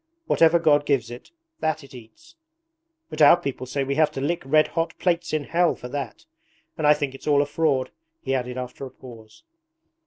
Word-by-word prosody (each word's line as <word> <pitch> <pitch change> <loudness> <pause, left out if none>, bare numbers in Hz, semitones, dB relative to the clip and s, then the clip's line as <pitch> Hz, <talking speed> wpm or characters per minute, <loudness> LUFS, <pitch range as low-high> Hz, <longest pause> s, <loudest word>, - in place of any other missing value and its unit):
Whatever 165 - +4
God 145 -3 +2
gives 125 -5 0
it, 120 - -10 0.3
that 155 -1 -1
it 140 - -15
eats! 130 - -15 0.8
But 155 - -4
our 150 +3 +8
people 140 -6 -5
say 140 +2 -2
we 135 +1 -2
have 155 - +4
to 135 - -5
lick 170 +5 -1
red 155 +3 +3
hot 165 0 -2
plates 175 -1 0
in 155 -1 -1
hell 170 +3 +1
for 125 - -9
that. 140 0 -6 0.5
And 155 - 0
I 150 - +7
think 145 -3 -3
it's 135 - -12
all 145 -1 +4
a - - -4
fraud,' 140 -4 0 0.3
he 135 - -3
added 125 -1 -2
after 125 +1 -7
a - - -11
pause. 115 - -15
145 Hz, 205 wpm, -24 LUFS, 130-160 Hz, 0.8 s, our